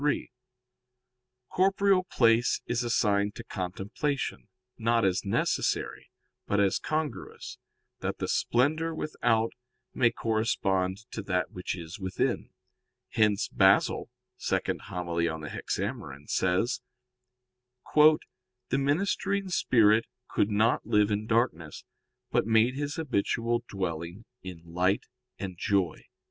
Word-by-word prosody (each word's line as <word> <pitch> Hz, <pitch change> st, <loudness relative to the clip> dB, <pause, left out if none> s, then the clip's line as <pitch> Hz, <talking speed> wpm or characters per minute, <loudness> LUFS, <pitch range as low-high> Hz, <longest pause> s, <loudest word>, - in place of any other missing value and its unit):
3: 145 Hz, -3 st, 0 dB, 1.2 s
Corporeal 195 Hz, 0 st, +3 dB
place 115 Hz, -5 st, +3 dB
is 120 Hz, 0 st, -1 dB
assigned 105 Hz, -3 st, +1 dB
to -, -, -7 dB
contemplation, 105 Hz, +10 st, -3 dB, 0.3 s
not 115 Hz, -1 st, +2 dB
as 95 Hz, -1 st, +1 dB
necessary, 100 Hz, -, -1 dB, 0.4 s
but 100 Hz, -, +1 dB
as 100 Hz, -2 st, +2 dB
congruous, 155 Hz, -1 st, -4 dB, 0.4 s
that -, -, -3 dB
the -, -, -3 dB
splendor 155 Hz, +6 st, +1 dB
without 115 Hz, -8 st, 0 dB, 0.4 s
may 120 Hz, -2 st, +4 dB
correspond 100 Hz, -4 st, 0 dB
to 110 Hz, -, -4 dB
that 90 Hz, -2 st, -1 dB
which 90 Hz, 0 st, -4 dB
is 85 Hz, +2 st, -8 dB
within. 95 Hz, -1 st, -1 dB, 0.6 s
Hence 105 Hz, -2 st, +2 dB
Basil -, -, +3 dB, 0.4 s
(Hom. 90 Hz, -1 st, -2 dB
ii 85 Hz, -, +2 dB
in 80 Hz, -1 st, -4 dB
Hexaem.) 95 Hz, -, -4 dB
says: 95 Hz, +7 st, +1 dB, 1.1 s
"The 155 Hz, 0 st, +7 dB, 0.6 s
ministering 195 Hz, +6 st, 0 dB
spirit 115 Hz, -, +4 dB, 0.2 s
could 105 Hz, -, +1 dB
not 110 Hz, +3 st, +2 dB
live 105 Hz, 0 st, +2 dB
in 105 Hz, +1 st, -1 dB
darkness, 110 Hz, -10 st, 0 dB, 0.5 s
but -, -, +2 dB
made 115 Hz, +2 st, +4 dB
his 145 Hz, +1 st, -3 dB
habitual 120 Hz, -4 st, 0 dB
dwelling 90 Hz, +1 st, -4 dB, 0.2 s
in 90 Hz, -3 st, -9 dB
light 90 Hz, +4 st, 0 dB, 0.3 s
and 95 Hz, -3 st, -6 dB
joy." 95 Hz, -6 st, 0 dB
110 Hz, 110 wpm, -28 LUFS, 95-125 Hz, 1.2 s, The